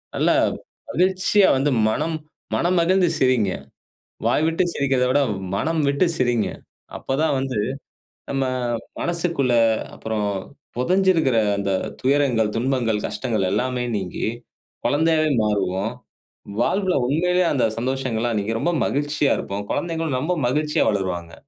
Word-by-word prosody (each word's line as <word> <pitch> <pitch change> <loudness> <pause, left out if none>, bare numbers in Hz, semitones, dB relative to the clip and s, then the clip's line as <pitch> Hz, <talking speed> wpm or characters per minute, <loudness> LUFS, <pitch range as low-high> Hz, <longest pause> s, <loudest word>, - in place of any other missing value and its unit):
நல்லா - - +3 0.5
மகிழ்ச்சியா 185 +4 +3
வந்து 140 +2 +1 0.2
மனம், 155 +8 -1 0.4
மனம் 180 +2 +1
மகிழ்ந்து 185 +1 +3
சிரிங்க. 125 -7 +3 0.8
வாய் 155 - +2
விட்டு 165 +3 +1
சிரிக்கிறதை 135 -2 +1
விட 145 - +3 0.3
மனம் 160 +9 0
விட்டு 140 +6 +2
சிரிங்க. 120 -4 +1 0.5
அப்ப 135 - -3
தான் 150 - +2
வந்து 130 -4 -3 0.7
நம்ம 135 -1 0 0.6
மனசுக்குள்ள 170 -7 0 0.4
அப்புறம் 110 -2 -2 0.5
புதைஞ்சிருக்கிற 170 -3 +2 0.2
அந்த 100 -1 -1 0.3
துயரங்கள், 130 -5 +2
துன்பங்கள், 120 -4 0
கஷ்டங்கள் 110 -7 -1
எல்லாமே 125 -1 0
நீங்கி 95 -3 -4 0.6
குழந்தையாவே 155 +4 +2
மாறுவோம். 100 +1 0 0.7
வாழ்வில 190 +1 +1
உண்மைலயே 180 +4 +2
அந்த 135 - +1
சந்தோஷங்கள்லா 120 -2 -1
இன்னைக்கி 110 +2 -1
ரொம்ப 175 - +1
மகிழ்ச்சியா 145 +1 0
இருப்போம். 100 +1 -4
குழந்தைகளும் 165 -4 -1
ரொம்ப 160 +8 -1
மகிழ்ச்சியா 150 +3 +1
வளருவாங்க. 90 -4 -2
135 Hz, 115 wpm, -22 LUFS, 115-165 Hz, 0.8 s, நல்லா